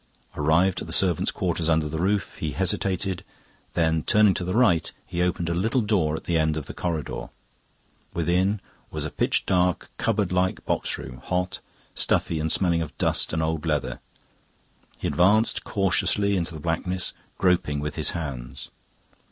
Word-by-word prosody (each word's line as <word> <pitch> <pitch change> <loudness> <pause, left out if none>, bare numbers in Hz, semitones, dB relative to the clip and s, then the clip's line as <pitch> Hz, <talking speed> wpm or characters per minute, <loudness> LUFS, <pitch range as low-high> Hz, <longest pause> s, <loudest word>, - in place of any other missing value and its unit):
Arrived 80 +5 +2
at - - -6
the - - -7
servants' 90 -4 +3
quarters 85 -1 -1
under 80 -1 +2
the 80 +1 -4
roof, 100 +2 0
he 75 -2 -2
hesitated, 95 0 0 0.5
then 80 -1 +2
turning 105 +3 +4
to 90 - -2
the 90 +2 -2
right 105 -10 +3
he 85 - -3
opened 90 -1 0
a 85 - 0
little 110 +9 +1
door 95 -8 +1
at - - -6
the 85 -2 +1
end 80 0 +1
of 75 - -4
the - - -8
corridor. 85 -4 -3 0.8
Within 90 +5 +1 0.3
was - - -3
a - - -4
pitch - - +1
dark 90 -2 +1
cupboard 105 -5 0
like 90 0 0
boxroom, 65 -1 -2
hot, 90 0 -1 0.3
stuffy, 80 - +1
and 80 +1 0
smelling 85 -2 +3
of 80 - -6
dust - - +1
and 80 0 0
old 80 -1 -1
leather. 75 -4 -1 1.0
He - - -3
advanced 105 +6 +3
cautiously 100 +1 +1
into 85 -2 -2
the - - -6
blackness, 85 +3 -1 0.2
groping 90 -6 +2
with 75 +1 -3
his 80 0 +2
hands. 65 -7 -6
85 Hz, 165 wpm, -25 LUFS, 80-95 Hz, 1.0 s, turning